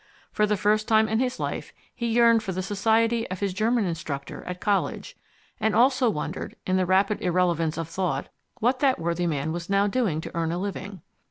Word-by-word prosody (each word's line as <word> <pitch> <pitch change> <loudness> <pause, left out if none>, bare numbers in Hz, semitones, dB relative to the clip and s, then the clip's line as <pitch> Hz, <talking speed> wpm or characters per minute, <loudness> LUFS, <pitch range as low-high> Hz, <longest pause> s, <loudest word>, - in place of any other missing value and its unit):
For 210 - +2
the 210 0 +1
first 210 +2 +1
time 220 -1 +4
in 220 +1 0
his 255 0 -1
life - - -4 0.2
he 235 - -3
yearned 230 0 +4
for 195 -3 -4
the 185 +1 -3
society 225 +4 +1
of 185 0 -5
his 200 -2 -1
German 220 +3 +1
instructor 160 -5 -5
at 180 0 -5
college, 200 0 -1 0.4
and 220 -1 +1
also 255 +1 +4
wondered 150 -8 -4
in 185 - +1
the 185 -1 +1
rapid 195 +3 +2
irrelevance 175 -4 +1
of 165 -1 -3
thought 165 -5 -2 0.3
what 245 +3 +1
that 270 -2 +3
worthy 170 +1 -1
man 155 -1 -1
was 170 +1 -5
now 200 0 +3
doing 205 -7 0
to - - -8
earn 165 -1 0
a 170 - -2
living. 195 -1 -5
200 Hz, 200 wpm, -25 LUFS, 175-225 Hz, 0.4 s, time